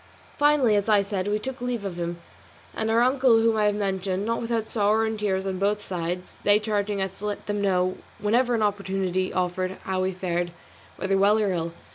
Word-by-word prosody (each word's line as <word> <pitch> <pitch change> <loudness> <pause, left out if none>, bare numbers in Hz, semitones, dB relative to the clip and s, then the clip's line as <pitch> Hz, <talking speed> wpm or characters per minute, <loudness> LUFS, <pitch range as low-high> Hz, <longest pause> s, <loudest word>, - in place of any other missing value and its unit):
Finally, 290 -7 +4
as 205 +1 0
I 205 -2 +5
said, 195 -1 -3
we 205 +1 +1
took 260 +5 -6
leave 245 -4 -2
of 190 -3 -4
him, 170 0 -3 0.6
and 220 0 -2
of 225 - +2
our 235 - +5
uncle 255 -2 +4
whom 225 0 +3
I 215 -1 +2
have 205 0 +2
mentioned, 195 -1 -1
not 230 +1 -1
without 230 -1 -1
sorrow 215 +1 +2
and 220 -1 -3
tears 190 -2 0
on 190 -1 -2
both 205 +1 +1
sides, 180 -1 -4
they 205 0 +5
charging 210 -1 -1
us 190 0 -3
to 210 - -4
let 205 - -4
them 205 0 -2
know 185 -2 +1 0.2
whenever 240 +4 +2
an 220 - +1
opportunity 190 -2 -1
offered 185 +1 -1
how 190 -1 -1
we 185 0 0
fared, 175 -2 -2 0.4
whether 195 0 0
well 205 +2 +5
or 210 -3 +1
ill. 165 -1 -3
205 Hz, 215 wpm, -25 LUFS, 185-220 Hz, 0.6 s, I